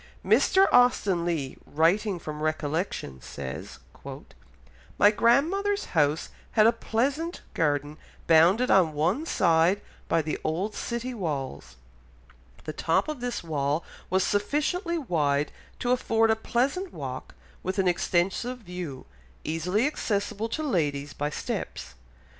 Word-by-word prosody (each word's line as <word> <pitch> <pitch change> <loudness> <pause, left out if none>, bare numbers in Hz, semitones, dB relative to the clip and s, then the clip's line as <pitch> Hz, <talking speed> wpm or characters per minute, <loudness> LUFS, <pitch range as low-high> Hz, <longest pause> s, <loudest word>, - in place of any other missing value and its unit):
Mr. 385 +1 +5
Austen 205 -8 +4
Leigh, 155 -6 -2
writing 180 +6 +2
from 155 -2 -7
recollection, 155 - -2
says: 65 +2 -7 1.2
"My 205 - +6
grandmother's 340 - +2
house 150 -1 +2 0.2
had 215 -2 +5
a 230 - +7
pleasant 285 +11 -1
garden 145 -2 0 0.3
bounded 175 +10 +5
on 175 -5 +5
one 180 - 0
side 170 - +3 0.3
by 165 -1 +2
the 155 - -3
old 180 +7 -1
city 235 +3 -4
walls; 140 - -4 0.9
the 155 - -5
top 165 +5 +1
of 305 -3 -4
this 245 -5 -3
wall 150 -1 -1 0.3
was 190 0 +2
sufficiently 305 - 0
wide 150 - 0 0.3
to 245 - -1
afford 225 -3 +3
a - - +3
pleasant 270 - -1
walk, 130 -2 -7 0.3
with 185 +2 -3
an 190 -1 +2
extensive 185 +7 0
view, 180 - -7 0.4
easily 180 - 0
accessible 215 -5 -1
to 310 - -3
ladies 145 - -1
by 145 +1 -2
steps.... 65 - -5
185 Hz, 125 wpm, -27 LUFS, 155-240 Hz, 1.2 s, a